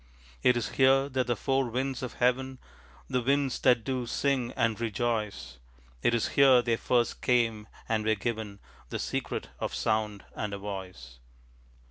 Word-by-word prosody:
It 125 -1 +4
is 120 - -2
here 135 +1 +4
that 130 -2 -1
the 120 - +1
four 135 +1 0
winds 130 +2 -2
of 125 - -5
heaven, 130 +2 0 0.5
The 125 -1 0
winds 135 +1 +1
that 125 -3 +4
do 130 -2 -2
sing 130 -1 0
and 115 -2 0
rejoice, 105 - -2 0.4
It 120 - +3
is 115 - 0
here 130 -3 +6
they 115 -2 +1
first 120 0 0
came 115 -4 +1 0.2
and 110 -1 0
were 110 0 +2
given 110 -1 -4 0.3
The - - -3
secret - - -3
of - - -3
sound 110 -2 -1
and 105 -2 -3
a - - -5
voice. 95 -11 -8
120 Hz, 160 wpm, -29 LUFS, 110-130 Hz, 0.5 s, here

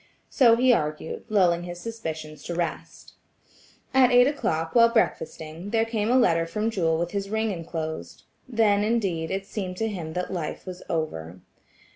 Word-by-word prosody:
So 235 -4 +6
he 250 +1 +4
argued, 150 -4 -2
lulling 180 -5 +3
his 175 0 -7
suspicions 160 -8 -6
to 170 - -4
rest. 170 0 -4 0.8
At 260 -2 +6
eight 245 0 +7
o'clock, 165 - -1
while 230 -1 +6
breakfasting, 165 -5 -1
there 225 +1 +2
came 225 -1 -1
a 250 - +4
letter 165 -9 +3
from 215 +6 -1
Jewel 165 -6 +1
with 170 +1 -2
his 200 -1 -3
ring 220 0 0
enclosed. 165 -3 -5 0.3
Then, 215 -4 +3
indeed, 195 -8 0
it 195 0 -3
seemed 185 -3 -5
to 225 - 0
him 170 -7 -5
that 180 +2 -3
life 165 -4 -4
was 185 -1 -7
over. 90 - -3
185 Hz, 165 wpm, -25 LUFS, 165-225 Hz, 0.8 s, eight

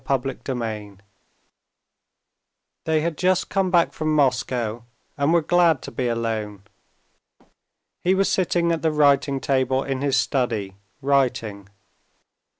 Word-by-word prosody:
Chapter 135 -1 0
15 110 -6 -4 1.9
They 160 -1 +1
had 165 -1 -3
just 185 0 +1
come 195 -1 +1
back 175 -2 +3
from 155 -1 -1
Moscow, 125 -5 0 0.3
and 140 +2 +1
were 170 -1 +3
glad 165 -4 +3
to - - -7
be 125 - -2
alone. 110 -4 -3 1.4
He 185 +2 +2
was 195 0 +2
sitting 175 -2 +1
at 165 - -1
the 160 - +1
writing 140 -2 +3
table 130 0 0
in 135 -1 -3
his 140 -1 +1
study, 115 -7 -1 0.3
writing. 115 -8 0
135 Hz, 125 wpm, -23 LUFS, 115-160 Hz, 1.9 s, back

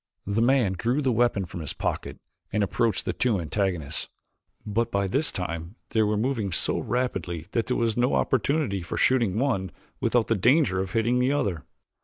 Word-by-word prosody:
The 100 +3 0
man 120 -5 +3
drew 120 +9 0
the 130 - +2
weapon 120 -4 +2
from 85 - -8
his 75 -4 -2
pocket - - -3 0.3
and 105 0 +1
approached 110 0 0
the - - -1
two 115 -6 +1
antagonists, 85 -2 -2 0.6
but 115 +2 0
by 100 0 +1
this 140 +11 +2
time 85 +1 -5
they 110 - +2
were 105 0 +1
moving 110 -4 -1
so - - +2
rapidly 90 -10 -2
that 115 - 0
there 125 - 0
was 115 -2 +1
no 120 +1 +2
opportunity 130 - +1
for 85 - -5
shooting 115 -7 +2
one 110 -9 0 0.3
without 120 -2 +2
the - - +1
danger 115 - +3
of 95 0 -3
hitting 120 +2 +2
the 125 +2 +2
other. 100 - -1
110 Hz, 185 wpm, -26 LUFS, 95-125 Hz, 0.6 s, man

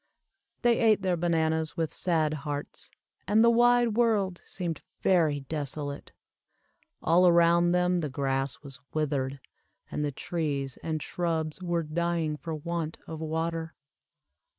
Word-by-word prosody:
They 240 -1 +4
ate 215 -4 +4
their 185 -2 +2
bananas 160 -1 0
with 165 -2 -1
sad 160 -4 +1
hearts, 145 0 -5 0.4
and 215 +4 +5
the 235 - +6
wide 240 0 +4
world 210 -5 +1
seemed 175 -4 -4 0.2
very 160 -6 +3
desolate. 145 0 -4 0.9
All 175 +3 +5
around 170 0 +5
them 180 0 +2
the 155 -3 -2
grass 135 0 -2
was 135 -3 -10 0.2
withered, 140 -3 -1 0.5
and 150 - -2
the 145 - -1
trees 140 -3 -3
and 155 -2 -3
shrubs 165 -1 -2
were 170 -2 0
dying 165 0 -1
for 160 +1 -5
want 165 +1 -3
of 160 -1 -7
water. 160 +1 -2
165 Hz, 130 wpm, -28 LUFS, 150-175 Hz, 0.9 s, the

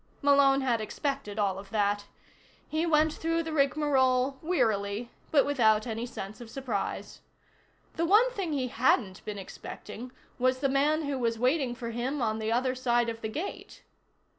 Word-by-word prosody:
Malone 280 -1 +5
had 240 -4 +1
expected 215 -2 -3
all 195 -3 0
of 195 - -11
that. 205 -1 0 0.6
He 315 +2 -1
went 310 -1 +3
through 330 +1 -1
the 320 -1 -5
rigmarole 275 -3 +2
wearily 220 - 0 0.2
but 285 -3 +4
without 220 -7 +3
any 230 0 -3
sense 215 -1 -7
of 235 - -9
surprise. 265 +1 -4 0.8
The 335 - +1
one 440 +7 +5
thing 390 -8 -3
he 260 -4 -1
hadn't 225 -5 +1
been 210 -1 -4
expecting 210 +4 -8 0.3
was 255 +1 +2
the 275 +1 0
man 295 +4 +2
who 285 -2 -2
was 230 -2 0
waiting 255 +1 +1
for 235 -1 -5
him 250 +5 -2
on 220 -3 0
the 220 0 -2
other 255 +2 +1
side 240 -2 +1
of 225 0 -6
the 220 - -3
gate. 320 - -6
255 Hz, 165 wpm, -29 LUFS, 225-285 Hz, 0.8 s, Malone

